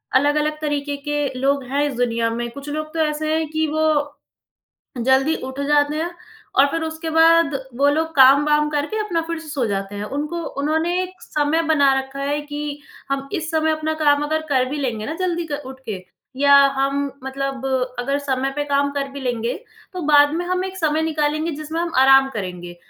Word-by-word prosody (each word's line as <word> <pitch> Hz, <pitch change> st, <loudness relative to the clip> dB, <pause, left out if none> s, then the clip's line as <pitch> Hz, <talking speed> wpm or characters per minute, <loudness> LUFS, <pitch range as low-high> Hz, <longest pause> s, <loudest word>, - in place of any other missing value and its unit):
अलग-अलग 300 Hz, +2 st, +2 dB
तरीके 290 Hz, -1 st, -2 dB
के 295 Hz, -1 st, 0 dB
लोग 275 Hz, 0 st, +1 dB
हैं 285 Hz, +1 st, +1 dB
इस -, -, -5 dB
दुनिया 230 Hz, -2 st, +1 dB
में। 235 Hz, +1 st, -3 dB
कुछ 280 Hz, +2 st, -9 dB
लोग 310 Hz, +1 st, -4 dB
तो 330 Hz, -, -3 dB
ऐसे 310 Hz, +1 st, -1 dB
हैं 320 Hz, 0 st, 0 dB
कि 315 Hz, 0 st, 0 dB
वो 300 Hz, -1 st, 0 dB, 0.9 s
जल्दी 270 Hz, +5 st, +3 dB
उठ 265 Hz, +1 st, -7 dB
जाते 295 Hz, 0 st, +3 dB
हैं 335 Hz, +2 st, -2 dB, 0.4 s
और 270 Hz, -, +6 dB
फ़िर 330 Hz, -, -1 dB
उसके 320 Hz, 0 st, -4 dB
बाद 325 Hz, -2 st, +4 dB, 0.2 s
वो 285 Hz, +1 st, +3 dB
लोग 315 Hz, +3 st, +1 dB
काम-वाम 295 Hz, +3 st, +5 dB
करके 300 Hz, +8 st, -2 dB
अपना 360 Hz, -6 st, -1 dB
फ़िर 335 Hz, -1 st, -3 dB
से 325 Hz, -, -12 dB
सो 275 Hz, -4 st, -1 dB
जाते 195 Hz, 0 st, -3 dB
हैं। 205 Hz, -, -4 dB
उनको 300 Hz, +4 st, -3 dB, 0.2 s
उन्होंने 320 Hz, +5 st, +1 dB
एक 370 Hz, 0 st, -8 dB
समय 300 Hz, +2 st, 0 dB
बना 280 Hz, -3 st, +4 dB
रखा 265 Hz, +1 st, -7 dB
है 285 Hz, +1 st, -1 dB
कि 290 Hz, 0 st, -6 dB, 0.5 s
हम 275 Hz, 0 st, -2 dB
इस 325 Hz, 0 st, -2 dB
समय 315 Hz, 0 st, +2 dB
अपना 310 Hz, 0 st, -1 dB
काम 290 Hz, 0 st, +4 dB
अगर 315 Hz, +1 st, -1 dB
कर 260 Hz, -2 st, +3 dB
भी 295 Hz, -, -3 dB
लेंगे 230 Hz, -6 st, -2 dB
ना, 310 Hz, -, -3 dB
जल्दी 345 Hz, -2 st, -2 dB
क 290 Hz, -, -2 dB
उठ 260 Hz, 0 st, -9 dB
के 190 Hz, -3 st, -5 dB, 0.3 s
या 280 Hz, 0 st, +6 dB, 0.2 s
हम 275 Hz, +1 st, 0 dB, 0.3 s
मतलब 270 Hz, 0 st, -4 dB, 0.3 s
अगर 275 Hz, +3 st, 0 dB
समय 270 Hz, -1 st, -1 dB
पे 290 Hz, -, -1 dB
काम 285 Hz, 0 st, +1 dB
कर 280 Hz, -1 st, -2 dB
भी 280 Hz, -, -7 dB
लेंगे। 240 Hz, -2 st, -1 dB, 0.4 s
तो 365 Hz, -, -4 dB
बाद 290 Hz, -1 st, +6 dB
में 350 Hz, +1 st, -2 dB
हम 365 Hz, +1 st, -1 dB
एक 380 Hz, 0 st, -7 dB
समय 315 Hz, -2 st, +1 dB
निकालेंगे, 310 Hz, 0 st, 0 dB
जिसमें 310 Hz, +2 st, -5 dB
हम 340 Hz, -1 st, -2 dB
आराम 270 Hz, 0 st, +6 dB
करेंगे 180 Hz, -6 st, -6 dB
290 Hz, 200 wpm, -21 LUFS, 270-315 Hz, 0.9 s, और